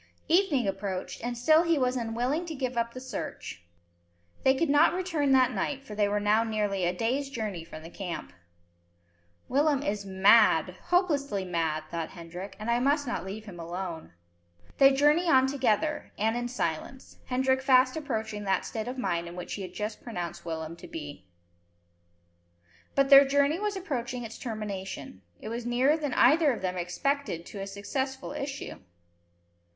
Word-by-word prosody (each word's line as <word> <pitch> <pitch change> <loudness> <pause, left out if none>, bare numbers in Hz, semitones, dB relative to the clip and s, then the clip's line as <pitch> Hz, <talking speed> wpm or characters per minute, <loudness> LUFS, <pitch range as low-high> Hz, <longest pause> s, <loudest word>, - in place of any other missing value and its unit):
Evening 320 - +3
approached, 195 +1 -4
and 240 0 -3
still 310 +7 +5 0.2
was 250 -1 +2
he 255 - -2
unwilling 245 +9 -1
to 320 - -5
give 255 -2 -3
up 235 0 -1
the - - -5
search. 255 - -6 0.8
They 265 0 +5
could 330 +5 +1
not 295 +4 +4
return 330 -7 0
that 255 -1 +5
night, 275 -1 -3
for 215 - -8
they 205 -1 +1
were 205 0 +1
now 210 +2 +3
nearly 210 -4 -1
a 175 - +2
day's 250 +9 -1
journey 215 - -4
from 155 -1 -10
the 165 - -9
camp. 175 - -6 1.1
"Willem 285 +1 +2
is 205 -3 -2
mad, 190 -2 +4
hopelessly 290 - +1
mad," 165 -3 -1
thought 165 -1 -3
Hendrik, 180 +2 -9
"and 215 +3 -2
I 235 - +2
must 285 +3 +2
not 245 - -3
leave 205 +3 -7
him 185 -5 -10
alone." 170 - -6 0.7
They 275 0 +8
journey 295 +6 +3
on 260 -3 +6
together, 275 +3 0
and 220 +2 +1
in 240 0 -2
silence, 245 - -4
Hendrik 260 +1 +1
fast 255 -1 +4
approaching 220 -8 -3
that 190 -1 +1
state 220 0 -4
of 255 +2 -5
mind 170 -8 -1
in 170 - -8
which 180 - -6
he 205 - -5
had 185 -1 -7
just 210 0 -4
pronounced 175 -8 -5
Willem 160 -1 -5
to - - -11
be. 145 - -8 1.7
But 275 0 +2
their 275 0 +11
journey 285 +4 +2
was 415 -1 -1
approaching 255 -9 -3
its 225 -1 -8
termination. 195 - -6 0.2
It 215 - -7
was 235 +1 -4
nearer 250 +5 +3
than 295 -5 -3
either 300 +2 +5
of 225 - -7
them 185 -1 -1
expected 180 - -2
to 200 - -8
a 195 - -4
successful 265 +8 -4
issue. 275 -1 -5
235 Hz, 170 wpm, -28 LUFS, 190-275 Hz, 1.7 s, their